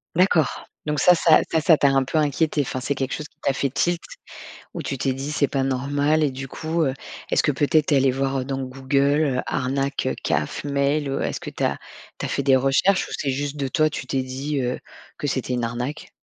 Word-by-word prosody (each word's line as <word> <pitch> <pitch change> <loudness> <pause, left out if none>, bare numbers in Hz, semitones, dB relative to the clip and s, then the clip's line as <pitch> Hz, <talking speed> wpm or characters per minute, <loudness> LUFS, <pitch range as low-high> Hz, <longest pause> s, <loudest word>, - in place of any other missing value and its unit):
D'accord. 175 -3 +2 0.2
Donc 150 -1 -1
ça 180 - +6
ça 165 -2 +5
ça, 160 - +3
ça 160 0 +5
t'a 140 - +4
un 135 -1 +3
peu 155 - -2
inquiétée, 150 0 +1
enfin, 130 -1 -3
c'est 140 +2 -2
quelque 135 0 -2
chose 150 - -5
qui - - -39
t'a - - +2
fait 140 +1 0
tilt, 170 +6 0 0.7
où - - -5
tu 135 - -3
t'es 130 +1 0
dit: 135 +3 -5
«C'est 145 - +2
pas 135 - 0
normal» 140 +4 +1
et 145 - +1
du 135 +1 -7
coup, 160 +4 -2
heu, 135 -2 0 0.4
est-ce - - +3
que, 150 - +2
peut-être, 150 +2 +2
tu 150 - +3
es - - +5
allée 135 0 +4
voir 135 0 -1
dans 135 0 -3
Google, 135 +3 +1 0.2
heu- - - +2
arnaque, 135 +2 -1 0.2
CAF, - - -1
mail 140 0 0
ou 135 - -2
est-ce 75 -2 -2
que - - -6
tu - - -6
as - - +1 0.4
tu - - -4
as - - -5
fait - - -1
des 135 -1 +5
recherches 135 +9 +2
ou - - -9
c'est 140 - -1
juste 140 +2 -3
de 140 -2 -2
toi, 155 +3 +2
tu 145 - -6
t'es 135 -1 -1
dit, 135 +3 -3
heu, 125 0 -1 0.4
que - - -2
c'était 130 -2 -2
une 120 -1 0
arnaque? 125 +5 -4
140 Hz, 240 wpm, -23 LUFS, 135-150 Hz, 0.7 s, ça